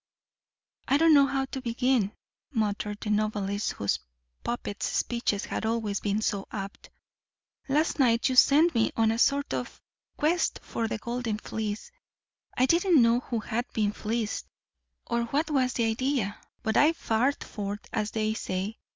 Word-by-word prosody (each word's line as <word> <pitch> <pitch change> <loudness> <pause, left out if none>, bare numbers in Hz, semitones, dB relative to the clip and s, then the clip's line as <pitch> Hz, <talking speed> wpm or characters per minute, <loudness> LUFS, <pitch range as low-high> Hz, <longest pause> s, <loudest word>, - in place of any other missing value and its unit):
"I 275 - +4
don't 325 +1 +6
know 280 -2 +7
how 270 -1 0
to 265 0 -6
begin," 245 -3 +1 0.4
muttered 210 -3 -1
the 215 - -2
novelist 210 -1 0
whose 100 - -1 0.4
puppets' 235 -3 -3
speeches 235 -4 -1
had - - -3
always 220 -3 -1
been 210 +1 -1
so 200 -3 -1
apt. 195 -2 -7 0.8
"Last 305 +3 +1
night 235 -3 +4
you 260 - 0
sent 305 +6 +6
me 230 -2 +2
on 225 -1 +4
a 225 - -2
sort 280 +3 +2
of - - -4 0.4
quest 330 +4 +1
for 230 - -2
the 220 - -2
golden 235 -1 -3
fleece. 215 - -4 0.7
I 255 - +5
didn't 340 +2 +4
know 235 0 +5
who 235 -2 -3
had 240 +3 -3
been 210 -2 +1
fleeced, 220 +1 -3 0.6
or 235 0 0
what 285 +7 0 0.3
the 235 - +2
idea 225 -2 0
was. - - -28 0.2
But 220 - +1
I 305 +3 +5
fared 255 -1 0
forth, 205 -1 -5
as 215 -1 0
they 215 0 -1
say. 195 0 -3
230 Hz, 160 wpm, -28 LUFS, 210-265 Hz, 0.8 s, know